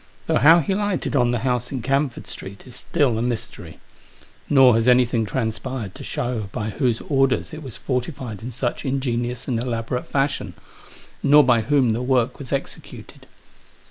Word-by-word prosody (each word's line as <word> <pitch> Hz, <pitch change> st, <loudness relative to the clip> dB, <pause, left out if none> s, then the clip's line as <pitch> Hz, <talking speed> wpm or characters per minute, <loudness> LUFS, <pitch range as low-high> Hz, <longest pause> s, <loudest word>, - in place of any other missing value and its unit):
Though -, -, +2 dB
how 165 Hz, +5 st, +7 dB
he 190 Hz, -, -1 dB
lighted 205 Hz, -5 st, -1 dB
on 120 Hz, -3 st, +3 dB
the 120 Hz, -, +1 dB
house 125 Hz, -1 st, -1 dB
in 130 Hz, -4 st, -4 dB
Camford 135 Hz, 0 st, -1 dB
Street 95 Hz, +1 st, -9 dB
is 125 Hz, -2 st, -10 dB
still 130 Hz, -5 st, 0 dB
a -, -, -1 dB
mystery. 120 Hz, -2 st, -5 dB, 0.7 s
Nor 135 Hz, -3 st, +6 dB
has 115 Hz, +2 st, +1 dB
anything 125 Hz, -2 st, +3 dB
transpired 110 Hz, -1 st, -3 dB
to -, -, -10 dB
show 115 Hz, -5 st, -3 dB
by 105 Hz, +1 st, -3 dB
whose 120 Hz, -2 st, 0 dB
orders 135 Hz, 0 st, +1 dB
it 155 Hz, -, -7 dB
was 130 Hz, -7 st, -8 dB
fortified 125 Hz, -, -4 dB
in 120 Hz, -, -6 dB
such 120 Hz, 0 st, -3 dB
ingenious 125 Hz, -3 st, -2 dB
and 120 Hz, -3 st, 0 dB
elaborate 120 Hz, 0 st, -3 dB
fashion; 135 Hz, -, -1 dB, 0.7 s
nor 145 Hz, +1 st, +6 dB
by 120 Hz, -3 st, +3 dB
whom 130 Hz, 0 st, +2 dB
the 115 Hz, +2 st, -1 dB
work 125 Hz, -2 st, +1 dB
was 135 Hz, -4 st, -8 dB
executed. 140 Hz, -, -6 dB
125 Hz, 170 wpm, -22 LUFS, 115-135 Hz, 0.7 s, how